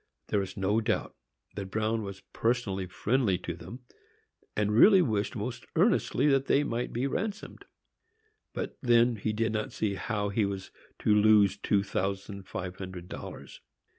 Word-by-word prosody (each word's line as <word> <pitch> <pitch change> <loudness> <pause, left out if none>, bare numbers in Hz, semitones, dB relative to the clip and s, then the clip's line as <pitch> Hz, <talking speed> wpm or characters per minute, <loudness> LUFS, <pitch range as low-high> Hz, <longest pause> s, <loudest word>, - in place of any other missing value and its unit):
There 100 - +2
is 95 +1 -6
no 100 +3 +1
doubt 110 - -1 0.4
that 100 -2 -5
Bruin 110 +2 0
was 100 -2 -7
personally 115 -6 0
friendly 105 +1 +1
to 85 -1 -5
them, 115 +9 -10 0.8
and 105 0 +1
really 190 - +7
wished 105 -7 -1
most 115 +2 -4
earnestly 180 - +2
that 135 -2 +3
they 145 - +4
might 120 -3 -2
be 120 +3 -1
ransomed; 205 +9 -4 0.9
but - - -5
then 120 -1 +4
he 110 +2 -1
did 110 +1 0
not 110 -1 -2
see 105 -2 -1
how 105 0 -2
he 105 +2 +1
was 100 -1 -4 0.3
to 105 - +3
lose 105 -1 +5
two 100 -2 +1
thousand 100 0 -3
five 95 0 -5
hundred 95 -2 -8
dollars. - - -9
105 Hz, 160 wpm, -29 LUFS, 100-120 Hz, 0.9 s, really